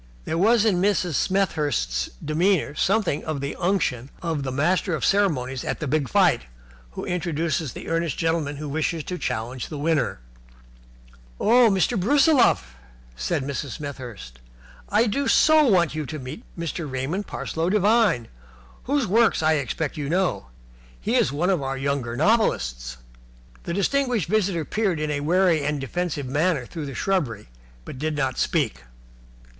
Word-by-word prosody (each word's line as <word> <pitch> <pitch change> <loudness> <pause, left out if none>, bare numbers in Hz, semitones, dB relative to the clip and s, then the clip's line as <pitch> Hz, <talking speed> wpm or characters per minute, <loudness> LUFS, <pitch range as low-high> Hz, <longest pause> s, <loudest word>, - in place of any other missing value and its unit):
There - - -2
was 215 +5 +4
in 185 -5 +2
Mrs. 190 -4 +1
Smethurst's 145 - 0 0.2
demeanour 165 +1 +1
something 195 -1 +1
of 155 -3 -3
the 140 +1 -4
unction 155 -9 0
of 165 -4 -2
the 135 -1 -3
master 170 +6 +1
of - - -2
ceremonies 135 -11 +1
at - - -3
the 155 - -3
big 145 -2 0
fight - - +3 0.5
who - - -5
introduces 165 -4 -2
the - - -8
earnest 165 -3 -1
gentleman 165 -3 0
who 150 +1 -6
wishes 160 +2 -1
to 180 +3 -5
challenge 120 +3 -3
the 150 - -6
winner. 150 - 0 1.2
"Oh, 235 +2 +5
Mr. 195 +3 +1
Brusiloff," 260 - +3 0.4
said 145 - -1
Mrs. 140 -1 -4
Smethurst, 120 - -8 0.5
"I 215 +3 +3
do 270 +5 -1
so 310 -1 +5
want 175 -8 +3
you 155 -2 -4
to 155 - -5
meet 140 - -8
Mr. 165 -2 -4
Raymond 140 +10 -3
Parsloe 165 +2 -2
Devine, 205 - +3 0.6
whose 280 -1 +1
work 220 -3 +3
I 160 0 +4
expect 145 +3 -3
you 145 -2 -3
know. 180 - 0 0.5
He - - -2
is - - +3
one 170 +7 +1
of 180 -6 +1
our 135 0 -3
younger 135 -3 -2
novelists." 60 - +1 0.7
The 170 - -3
distinguished 245 - +1
visitor 195 -6 +1
peered 195 -5 0
in 155 0 -1
a 145 - -1
wary 170 0 +2
and 150 0 -1
defensive 150 +1 -3
manner 145 +1 0
through 155 +2 -6
the 135 - -7
shrubbery, 135 - -1 0.4
but 130 - -8
did 155 +1 -1
not 130 -3 -1
speak. - - 0
160 Hz, 155 wpm, -24 LUFS, 140-190 Hz, 1.2 s, Oh